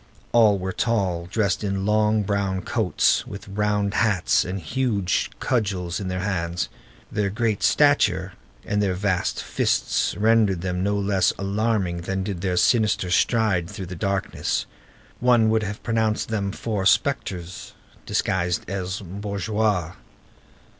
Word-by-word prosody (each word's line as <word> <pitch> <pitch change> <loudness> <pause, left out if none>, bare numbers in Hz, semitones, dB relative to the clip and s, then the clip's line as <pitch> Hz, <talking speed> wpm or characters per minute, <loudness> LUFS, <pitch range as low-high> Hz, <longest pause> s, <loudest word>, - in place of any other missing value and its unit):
All 110 -4 +5
were 95 0 -3
tall, 95 -7 0
dressed 100 0 0
in 95 -1 -1
long, 105 0 +2
brown 100 -2 -1
coats, - - +1
with 100 +1 -9
round 105 0 0
hats, 105 -6 +2
and 95 +2 -4
huge 100 - 0
cudgels 95 -8 -1
in 100 - -4
their 90 0 -2
hands. 85 -8 -2 0.4
Their 105 -1 0
great 110 0 -1
stature 100 -11 +3 0.3
and 105 0 0
their 95 -3 +1
vast 95 -1 -1
fists - - 0
rendered 105 -4 +3
them 90 0 -2
no 100 +2 +1
less 100 -2 +2
alarming 100 -2 0
than 95 +2 -3
did 95 -3 -4
their 90 -2 -1
sinister 105 -4 +2
stride 100 -5 +2
through 100 -2 -6
the 90 +1 -7
darkness. 100 +2 -1 0.5
One 120 -3 +4
would 110 0 +2
have 105 0 -5
pronounced 110 -2 0
them 100 -3 -1
four 100 -3 -1
spectres 95 -12 -1 0.3
disguised 90 -2 0
as 95 0 -3
bourgeois. 100 -1 -1
100 Hz, 135 wpm, -24 LUFS, 90-110 Hz, 0.5 s, All